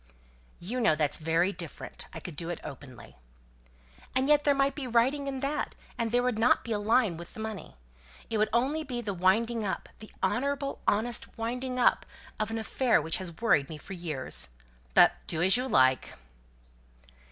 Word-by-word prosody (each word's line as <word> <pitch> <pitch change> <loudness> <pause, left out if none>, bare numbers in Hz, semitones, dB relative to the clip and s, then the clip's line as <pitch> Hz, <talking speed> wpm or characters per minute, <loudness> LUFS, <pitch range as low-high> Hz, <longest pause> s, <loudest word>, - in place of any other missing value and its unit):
"You 235 +8 -3
know 225 -9 +4
that's 150 -2 0
very 165 +4 +1
different. - - -7
I - - -7
could 175 -5 -8
do 165 +3 -4
it 175 - -4
openly." 130 -2 -11 1.0
"And 260 +1 +2
yet 295 0 +4
there 285 -1 +4
might 275 0 +2
be 280 -4 -5
writing 260 +4 +2
in 270 -1 -3
that; 285 +2 -2 0.2
and 230 -2 -1
there 245 +2 +2
wouldn't 245 -1 +3
be 235 - -6
a 210 - +1
line 215 -4 +2
with 170 +6 -9
the - - -9
money. 220 -2 -6 0.5
It 220 - -1
would 215 - +2
only 270 +7 +1
be 250 -4 -4
the 205 -4 -3
winding 220 +6 +2
up 195 - -3
the 215 - -11
honourable, 275 +5 -1
honest 235 +4 0
winding 250 +3 -3
up 250 - +3 0.3
of 215 0 -1
an 225 - -3
affair 235 +2 +2
which 160 +1 0
has 175 -4 -6
worried 155 -12 +3
me 155 - -6
for 195 - -9
years. 135 - -3 0.5
But - - +8 0.2
do 160 - +2
as 190 +1 +8
you 250 +2 0
like!" 130 - +3
225 Hz, 185 wpm, -29 LUFS, 175-250 Hz, 1.0 s, But